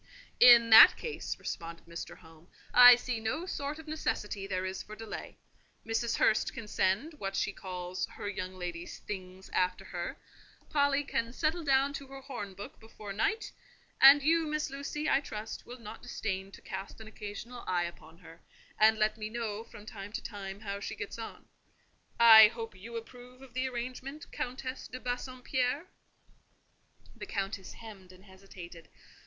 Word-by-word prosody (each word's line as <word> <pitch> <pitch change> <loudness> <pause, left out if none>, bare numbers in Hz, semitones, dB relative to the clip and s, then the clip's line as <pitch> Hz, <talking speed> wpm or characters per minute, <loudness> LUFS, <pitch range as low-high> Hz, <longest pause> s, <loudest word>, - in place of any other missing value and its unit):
"In 235 -2 +8
that 220 - +10
case," 465 - -5
responded 170 0 -6
Mr. 170 0 -8
Home, 160 0 -18 0.3
"I 245 0 +11
see 245 -1 -3
no 225 +10 -2
sort 290 -4 -4
of 320 - -12
necessity 210 -10 -3
there 185 -1 -2
is 190 0 -4
for 215 - -10
delay. 220 -1 -8 0.5
Mrs. 225 +1 0
Hurst 215 - +2
can 225 - -7
send 210 - 0
what 195 0 -3
she 200 - 0
calls 180 -1 -5
her - - -7
young 185 -2 -4
lady's 175 -1 -6
'things' 190 -1 -8
after 180 +1 0
her; 175 -2 -5 0.5
Polly 285 -1 +2
can 230 -4 -2
settle 320 +6 -1
down 275 0 +3
to 275 -2 -7
her 270 0 -10
horn 210 -8 -7
book 200 - -9
before 215 -2 -9
night; 420 - -1 0.5
and 275 +1 +9
you, 325 +1 +3
Miss 305 -2 -2
Lucy, 285 +2 -4
I 270 - +4
trust, 215 -5 -7
will 245 - -8
not 230 -3 -10
disdain 190 -2 -4
to - - -13
cast 195 +3 -7
an 220 - -10
occasional 220 +3 -8
eye 175 -1 +1
upon 170 -1 -10
her, 165 -1 -15 0.4
and 220 +1 +6
let 215 0 +1
me 215 -1 -5
know, 225 -2 -4
from 210 -2 -13
time 205 -2 -8
to - - -4
time, 200 -2 -7
how 200 -2 -4
she - - -5
gets 420 0 -6
on. - - -8 0.7
I 220 -2 +11
hope 225 0 -7
you 220 +5 -10
approve 250 +2 -10
of 260 -3 -15
the 255 +1 -1
arrangement, 255 +5 -6
Countess 255 +1 -5
de 255 - -8
Bassompierre?" 255 +3 -2 1.3
The - - -8
Countess 195 -1 -4
hemmed 200 -5 -12
and 185 +2 -17
hesitated. 185 -3 -12
220 Hz, 170 wpm, -31 LUFS, 195-255 Hz, 1.3 s, I